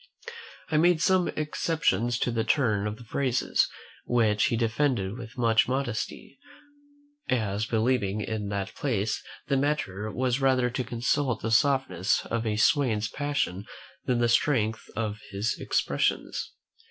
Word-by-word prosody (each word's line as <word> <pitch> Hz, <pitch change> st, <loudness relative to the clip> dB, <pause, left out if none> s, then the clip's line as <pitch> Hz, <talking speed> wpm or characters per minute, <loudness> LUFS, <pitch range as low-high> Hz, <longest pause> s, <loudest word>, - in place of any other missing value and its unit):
I 155 Hz, -, +3 dB
made 175 Hz, +1 st, +4 dB
some 185 Hz, +1 st, +3 dB
exceptions 150 Hz, -6 st, 0 dB
to 125 Hz, -, +1 dB
the 115 Hz, -1 st, 0 dB
turn 110 Hz, -6 st, +1 dB
of 105 Hz, 0 st, -4 dB
the 120 Hz, -, -12 dB
phrases; 130 Hz, +2 st, +1 dB, 0.4 s
which 110 Hz, -3 st, +2 dB
he 120 Hz, -4 st, +1 dB
defended 115 Hz, -3 st, 0 dB
with 120 Hz, 0 st, -9 dB
much 115 Hz, -2 st, +3 dB
modesty, 135 Hz, -, -3 dB, 0.9 s
as 110 Hz, -4 st, 0 dB
believing 110 Hz, -3 st, +1 dB
in 105 Hz, -1 st, -3 dB
that 100 Hz, -1 st, -3 dB
place 110 Hz, -6 st, -1 dB, 0.3 s
the 140 Hz, -1 st, +2 dB
matter 120 Hz, -8 st, -1 dB
was 125 Hz, +3 st, 0 dB
rather 130 Hz, -2 st, +3 dB
to 130 Hz, +1 st, -2 dB
consult 125 Hz, +1 st, -1 dB
the 115 Hz, -, -1 dB
softness 130 Hz, -6 st, +2 dB
of 115 Hz, -1 st, -2 dB
a 105 Hz, -, 0 dB
swain's 110 Hz, -2 st, +2 dB
passion 140 Hz, -9 st, -2 dB, 0.4 s
than 125 Hz, -2 st, +1 dB
the 120 Hz, 0 st, +2 dB
strength 115 Hz, -2 st, +1 dB
of 105 Hz, -2 st, -2 dB
his 100 Hz, +4 st, -2 dB
expressions. -, -, -1 dB
120 Hz, 140 wpm, -27 LUFS, 105-135 Hz, 0.9 s, made